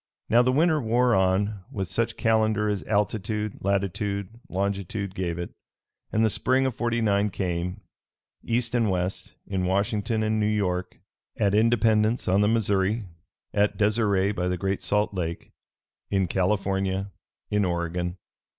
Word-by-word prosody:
Now 120 +2 +6
the 125 +1 +2
winter 155 +2 +3
wore 120 +1 +2
on 95 +1 +1
with 95 -2 -3
such 115 +7 -1
calendar 110 -1 +2
as 105 -2 -1
altitude, 105 0 -1
latitude, 100 0 -1 0.2
longitude 100 +1 -2
gave 90 -3 -2
it, 85 0 -5 0.6
and 110 +1 +3
the - - +3
spring 130 +5 +2
of 130 - 0
'49 110 -4 +1
came, 90 0 -3 0.6
East 115 0 -1
and 115 -3 +2
West, 90 0 -3
in 95 -2 -2
Washington 105 +4 0
and 110 0 +1
New 105 - +2
York; 90 -4 -1 0.4
at 100 -1 +2
Independence 110 0 +3
on 95 +2 +3
the 105 - +3
Missouri; 105 -1 +1 0.5
at 105 0 +2
Deseret 105 -2 +2
by 90 -2 -1
the 90 0 -1
Great 95 +2 -1
Salt 105 +3 +1
Lake; 85 -3 -4 0.6
in 95 -1 +2
California; 95 +1 0 0.4
in 105 0 +2
Oregon. 85 0 -2
100 Hz, 140 wpm, -26 LUFS, 95-110 Hz, 0.6 s, Now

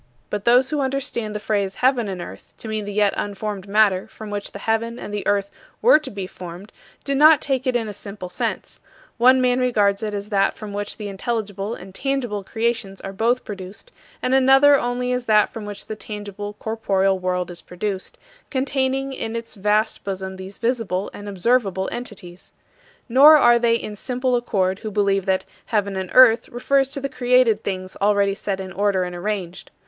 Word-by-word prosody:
But 210 -1 -3
those 250 +3 +4
who 300 - 0
understand 260 -5 -2
the - - -2
phrase 200 -2 -1
"heaven 250 -3 +2
and 190 -2 -4
earth" - - -12
to - - -9
mean 215 -1 -3
the 205 - -5
yet 205 0 +2
unformed 205 -1 -4
matter 200 -2 +3
from 215 -1 -10
which 205 0 -4
the - - -8
heaven 225 +2 -1
and 205 - -7
the 205 - -3
earth 200 -1 +1 0.3
were 475 -9 +6
to 300 -3 -7
be 200 -4 -5
formed 180 +2 -10 0.3
do 275 - -1
not 300 +2 +7
take 265 -2 -2
it 255 - +1
in 230 -2 0
a 210 - -5
simple 200 -1 -8
sense: 180 - -4 0.4
one 255 +2 +6
man 250 0 +2
regards 210 -5 +2
it 210 -1 -3
as 200 +1 -5
that 195 -2 +1
from 210 -2 -8
which 205 0 -3
the 210 -2 -5
intelligible 205 0 -3
and 185 +1 -12
tangible 245 -5 -2
creations 225 -2 -2
are 195 - -6
both 235 +5 +1
produced; 200 - -9 0.3
and 255 - +1
another 270 +2 +6
only 250 -1 -1
as 250 -1 -2
that 215 -2 +3
from 220 -2 -6
which 205 -1 -6
the 215 - -5
tangible, 205 -1 -7
corporeal 195 -3 0
world 180 -1 -2
is 175 - -6
produced, 190 +1 -5 0.3
containing 270 0 -1
in 225 -3 -4
its 230 0 -5
vast 210 +2 0
bosom 190 -1 -4
these 190 +1 -9
visible 225 -6 -1
and 205 0 -8
observable 195 -1 +1
entities. 195 -7 -8 0.6
Nor 280 +5 +8
are 240 -4 +5
they 230 -1 +3
in 215 -2 -4
simple 250 +3 -1
accord 195 -6 0
who 215 - -5
believe 195 -2 +1
that 190 -1 +1 0.2
"heaven 200 -3 0
and 190 -1 -4
earth" 245 -3 +7
refers 270 +3 +1
to 280 +1 -4
the 275 - -2
created 250 -4 +2
things 185 -1 -4
already 200 -1 +3
set 195 -1 -3
in 190 -1 -6
order 195 -1 +1
and 180 0 -5
arranged. 185 -1 -4
210 Hz, 195 wpm, -22 LUFS, 195-245 Hz, 0.6 s, Nor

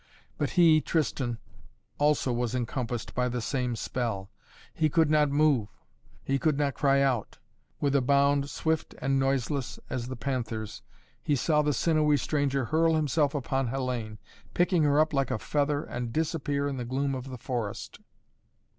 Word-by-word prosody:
But - - 0
he, 160 -3 +6
Tristan, 130 -7 -1 0.6
also 145 -3 +2
was 120 0 -1
encompassed 120 -1 -3
by 125 0 0
the 125 0 -2
same 125 0 -1
spell. 110 -3 -3 0.4
He 155 -2 +1
could 160 0 +3
not 150 -1 +4
move 145 -6 +3 0.6
he 135 0 0
could 150 0 +1
not 145 -2 +1
cry 140 +2 +2
out. 125 -6 -1 0.4
With 140 -1 +1
a 140 - +4
bound, 140 +1 +2
swift 160 +2 -2
and 135 0 +1
noiseless 135 0 -1
as 120 -1 -3
the 130 - -5
panther's, 115 -4 -4 0.4
he 145 - +1
saw 150 +3 +2
the 150 0 +1
sinewy 150 +1 +2
stranger 140 -1 0
hurl 160 +5 +2
himself 150 -1 +1
upon 135 -1 -1
Hellayne, 120 -4 -3 0.4
picking 175 -1 +3
her 145 0 +3
up 155 0 +2
like 135 -1 +1
a 130 - -1
feather 145 +4 0
and 120 -1 -5
disappear 145 -1 -1
in 140 -2 -3
the 125 - -3
gloom 135 +3 -1
of 130 0 -5
the 130 - -6
forest. 115 -4 -4
135 Hz, 165 wpm, -28 LUFS, 125-150 Hz, 0.6 s, he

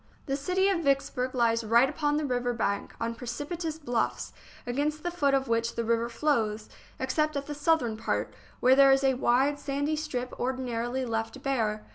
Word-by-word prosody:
The 275 - -1
city 365 +7 +1
of 390 -3 +2
Vicksburg 270 -2 0
lies 230 -1 +2
right 235 +4 +5
upon 295 +1 0
the 305 - -1
river 245 -2 0
bank, 200 -3 -2
on 230 0 -2
precipitous 295 +7 -4
bluffs, 245 -7 -2 0.3
against 295 +5 -1
the 350 - -1
foot 285 -5 +2
of 270 0 0
which 230 0 0
the 235 - -1
river 230 +1 0
flows, 230 -5 0 0.3
except 300 +3 0
at 280 - -3
the 295 - -5
southern 290 -7 +1
part, 225 - -2 0.3
where 255 +1 +6
there 275 0 +7
is 270 0 +3
a 270 -1 +4
wide, 265 +3 +2
sandy 285 +2 -1
strip 255 -5 -4
ordinarily 255 0 -2
left 225 +3 -3
bare. 220 -6 -1
260 Hz, 180 wpm, -28 LUFS, 235-290 Hz, 0.3 s, there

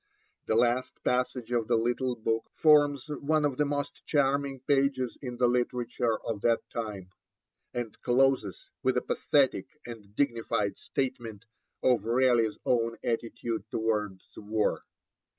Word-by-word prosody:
The 110 - +2
last 120 +2 +2
passage 125 -1 -1
of 120 -3 0
the 120 - +3
little 120 +2 0
book 115 0 -2
forms 145 -3 +4
one 150 +1 0
of 140 -3 -1
the 150 - +2
most 145 0 -3
charming 140 -2 +1
pages 135 -3 +1
of 125 -3 -5
the 125 - +3
literature 120 -1 0
of 110 -3 -3
that 115 +1 +1
time, 105 -5 -5 0.6
and 120 -3 -5
closes 125 -6 +1
with - - +1
a - - 0
pathetic 140 -2 +1 0.2
and 105 -4 -10
dignified 115 -6 0
statement 120 -5 -4 0.4
of 120 -5 +3
Raleigh's 120 -2 +3
own 115 -1 +1
attitude 115 -1 -3
towards 105 -4 -1
war. 105 +1 0
120 Hz, 135 wpm, -29 LUFS, 115-135 Hz, 0.6 s, forms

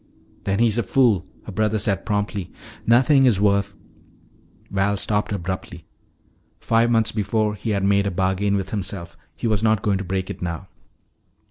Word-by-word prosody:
"Then 100 0 0
he's 115 0 +2
a - - +3
fool!" 105 -5 +2 0.2
her - - -7
brother 110 +2 0
said 100 -1 -1
promptly. 105 -3 -2 0.4
"Nothing 135 +4 +5
is 110 -6 +3
worth 100 0 +2 0.5
" - - -32
Val 100 +1 +1
stopped 105 +2 0
abruptly. 95 -3 -5 0.7
Five 115 +1 +2
months 115 -2 +2
before 110 0 0
he 105 +2 -5
had 100 -2 0
made 100 0 +3
a - - +1
bargain 95 +2 0
with 95 -1 -3
himself; 95 -4 -4 0.2
he 80 - -6
was 110 -3 +1
not 110 -2 +2
going 100 -2 +1
to - - -3
break 95 0 -3
it - - -9
now. 85 +1 -4
100 Hz, 170 wpm, -22 LUFS, 95-110 Hz, 0.7 s, Nothing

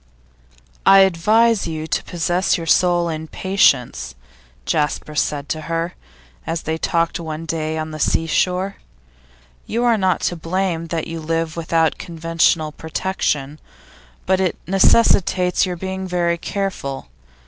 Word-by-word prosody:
'I 195 0 +7
advise 210 +4 +3
you 155 -1 -4
to 150 - -1
possess 175 +3 0
your 165 - -5
soul 175 +1 +3
in 160 -1 -4
patience,' 150 - +1 0.5
Jasper 150 0 -1
said 145 -1 -1
to 155 - -2
her, 165 +1 -1 0.5
as 165 - -2
they 160 0 -2
talked 170 0 0
one 160 -1 -5
day 160 -1 -2
on 155 0 -4
the 155 - -7
sea 165 - +1
shore. 185 +4 0 0.9
'You 235 +2 -1
are 235 -3 +3
not 185 -2 +1
to 175 - 0
blame 170 0 -2
that 165 -1 -3
you 165 0 -6
live 165 0 -2
without 165 -1 0
conventional 165 -2 0
protection, 155 -3 -2 0.7
but 190 - +2
it 185 -3 0
necessitates 190 -2 +3
your 180 -1 -4
being 190 +1 -4
very 170 -1 0
careful. 175 - -4
165 Hz, 135 wpm, -20 LUFS, 160-185 Hz, 0.9 s, I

